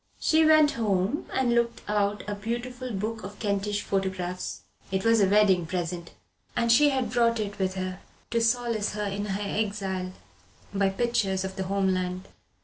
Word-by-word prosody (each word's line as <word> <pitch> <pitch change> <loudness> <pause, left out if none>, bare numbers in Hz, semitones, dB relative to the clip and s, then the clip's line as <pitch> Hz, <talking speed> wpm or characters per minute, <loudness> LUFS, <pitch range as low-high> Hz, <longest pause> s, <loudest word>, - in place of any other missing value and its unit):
She 320 0 +4
went 310 -1 +6
home 210 +2 0
and 250 -2 +1
looked 235 0 +1
out 205 0 0
a 205 - -2
beautiful 240 +4 -4
book 220 +2 -3
of 200 +2 -8
Kentish 205 -1 -1
photographs. 185 - -3 0.3
It 190 +2 -1
was 230 -1 +5
a 195 - +5
wedding 195 -4 +4
present, 175 -1 -4 0.4
and 235 -1 +2
she 290 +5 +6
had 260 -5 -1
brought 235 -1 +2
it 205 -1 -4
with 190 0 0
her 185 0 -4 0.3
to 230 - +2
solace 230 -2 +1
her 210 0 -3
in 200 +1 -3
her 200 0 -2
exile 195 -3 -2 0.6
by 195 -1 +2
pictures 195 -3 0
of 190 0 -5
the 190 -1 -3
home 195 0 +1
land. 185 +1 -3
205 Hz, 170 wpm, -27 LUFS, 190-230 Hz, 0.6 s, went